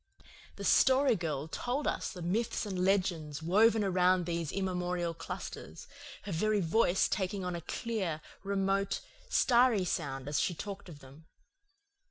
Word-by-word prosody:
The - - -8
Story 265 -1 +4
Girl 155 -5 -3
told 250 - -3
us - - -1
the 180 -3 -8
myths 215 +7 -1
and 185 -3 -2
legends 175 -6 0
woven 215 +6 +4
around 185 -1 +3
these 170 -3 -2
immemorial 180 -2 -1
clusters, 165 0 -7 0.4
her 205 - -6
very 210 +5 +1
voice 180 +1 +2
taking 190 -1 -2
on 180 -1 -2
a 170 - -5
clear, 190 -5 -3 0.2
remote, 195 0 0 0.3
starry 240 -5 +4
sound 135 -6 -3
as 145 0 0
she 175 - 0
talked 200 +1 -7
of 145 -4 -12
them. 140 +5 -15
185 Hz, 145 wpm, -32 LUFS, 165-205 Hz, 0.4 s, Story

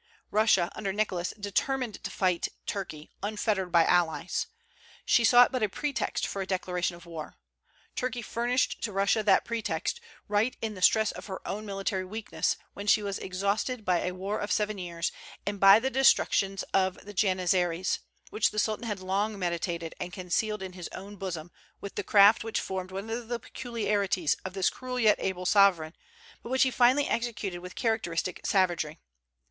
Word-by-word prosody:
Russia, 210 -5 +3
under 200 -2 -3
Nicholas, 190 -4 -1
determined 225 +3 -1
to - - -3
fight 185 -3 0 0.2
Turkey, 160 -6 -5
unfettered 205 -2 -1
by 170 -1 +5
allies. 175 -3 +1 0.6
She 235 - +4
sought 245 +1 +7
but 255 -2 -1
a 215 - +2
pretext 290 +7 -2
for 195 - -4
a 190 - -4
declaration 180 -2 -1
of 170 0 -14
war. 165 -3 -8 0.6
Turkey 250 -1 -2
furnished 240 +3 0
to 220 - -2
Russia 195 +2 +2
that 205 -2 +4
pretext, 235 - -2 0.3
right 210 +4 +1
in 220 -1 -3
the 185 - -10
stress 220 +3 +4
of - - -9
her 190 -2 -7
own 210 +2 -4
military 195 -1 -2
weakness, 215 +4 -2 0.2
when 200 +1 -7
she 210 +1 +4
was 200 -1 -3
exhausted 200 +5 -2
by 180 -2 +3
a 180 +1 -3
war 195 +3 -3
of 205 - -3
seven 210 -1 0
years, 170 -2 -3 0.3
and 205 0 -3
by 195 +1 +9
the 265 +3 -1
destruction 200 -7 +3 0.2
of 190 -1 +1
the 205 - -9
Janizaries, 185 -2 +1 0.3
which 215 - +2
the - - -10
Sultan 215 +2 0
had 205 -3 -3
long 200 +3 -1
meditated, 170 -2 -2
and 180 - -4
concealed 190 +3 -2
in 185 -1 -7
his 180 -2 -7
own 200 +2 -8
bosom 175 -4 -5 0.3
with 200 - -7
the - - -3
craft 205 +1 +6
which 225 0 -1
formed 185 -1 -4
one 195 +3 -6
of 235 0 -4
the 240 0 -2
peculiarities 205 - -1
of 190 - -5
this 190 -2 +2
cruel 255 0 -5
yet 215 -3 +4
able 185 -1 -2
sovereign, 180 -5 +4 0.5
but - - -9
which 260 +1 +4
he 260 - +2
finally 255 +4 +4
executed 230 -6 -2
with 180 +1 -10
characteristic 185 -6 -1
savagery. 175 -5 +1
200 Hz, 175 wpm, -28 LUFS, 185-220 Hz, 0.6 s, by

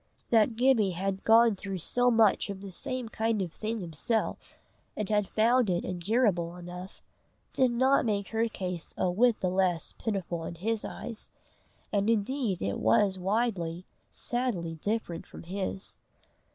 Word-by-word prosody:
That 225 0 +4
Gibbie 225 -7 +3
had 195 +1 -2
gone 225 -1 +6
through 195 0 -5
so 245 +8 +2
much 225 -4 +4
of 200 -1 -5
the 200 -1 -8
same 250 +6 -2
kind 225 -1 0
of 180 -4 -3
thing 220 0 -3
himself, 180 +7 -2 0.4
and 210 - -2
had 210 -1 +1
found 235 +1 +3
it 175 -1 0
endurable 180 -2 +1
enough, 180 +2 -9 0.5
did 260 -1 +4
not 260 +3 +3
make 205 -4 -1
her 225 +1 +1
case 180 -6 -5
a 180 - +1
whit 230 +4 +3
the 185 - +1
less 185 -3 +1
pitiful 185 -6 -2
in 170 - -6
his 215 +5 -1
eyes, 230 -2 -7 0.6
and 205 +1 +2
indeed 230 -2 0
it 100 0 -1
was 190 - +3
widely, 185 -4 -1 0.2
sadly 235 -10 -2
different 205 -6 -2
from - - -11
his. 190 +2 -4
200 Hz, 150 wpm, -29 LUFS, 180-230 Hz, 0.6 s, gone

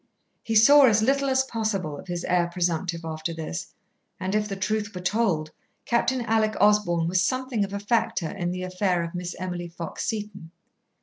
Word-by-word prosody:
He 225 - -3
saw 280 +6 +8
as 215 -2 +3
little 275 +3 +2
as 265 0 +3
possible 215 - -2
of 145 - -11
his 175 -1 -3
heir 175 -1 +2
presumptive 175 0 -1
after 160 +1 -4
this, 155 - -5 0.5
and 185 +1 -3
if 210 0 +1
the 200 - -4
truth 210 +1 -2
were 180 - -5
told, 180 -6 0 0.3
Captain 245 +2 +1
Alec 220 -1 +1
Osborn 200 -5 +3
was 180 +1 +2
something 255 +1 0
of 200 - -4
a 200 - -3
factor 205 -5 0
in 180 -4 -3
the 185 +1 -4
affair 185 -1 0
of 170 - -6
Miss 175 0 -5
Emily 180 -1 -4
Fox 170 -1 -6
Seton. 205 -6 -4
190 Hz, 185 wpm, -25 LUFS, 175-220 Hz, 0.5 s, saw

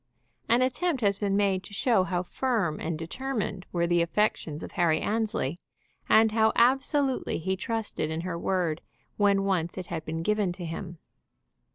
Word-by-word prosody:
An 240 +2 +4
attempt 265 +3 0
has 200 -2 +2
been 200 -1 +1
made 195 -2 +2
to 200 +2 -10
show 220 -4 +3
how 180 -2 -1
firm 205 -7 -1
and 160 0 -3
determined 205 +2 -4
were 170 -1 +1
the 175 0 +2
affections 165 -3 0
of - - -7
Harry 160 -2 +2
Annesley, 210 -8 -1 0.5
and 220 0 +6
how 220 0 +3
absolutely 265 +2 +2
he 190 +4 -1
trusted 215 -5 -3
in 160 +1 -2
her 180 -1 -4
word 170 -2 -1 0.4
when 200 -1 +3
once 180 -3 -1
it 185 - -4
had 160 -2 -3
been 160 +1 -4
given 210 -1 +1
to 175 -1 -7
him. 170 +1 -6
195 Hz, 170 wpm, -28 LUFS, 170-220 Hz, 0.5 s, and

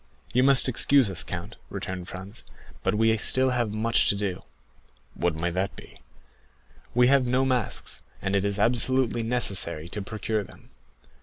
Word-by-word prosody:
"You 125 - +4
must 135 0 +5
excuse 130 -2 +3
us, 90 -2 -1
count," 85 - -7
returned 90 -1 -5
Franz, 95 +4 -9 0.4
"but - - 0
we 115 +1 +3
have 110 -1 +1
still 130 0 +2 0.2
much 110 +2 +1
to - - +3
do." 100 -3 -3 0.7
"What 85 -2 -1
may 85 +2 -1
that 95 +3 -2
be?" - - -14 1.0
"We 125 0 +5
have 135 -2 +4
no 130 +2 +2
masks, 125 -5 -2 0.2
and 95 0 -2
it 100 - +1
is 100 0 -1
absolutely 120 +2 +2
necessary 100 -9 +1
to 105 - -5
procure 110 +1 -3
them." - - -17
110 Hz, 160 wpm, -26 LUFS, 95-125 Hz, 1.0 s, must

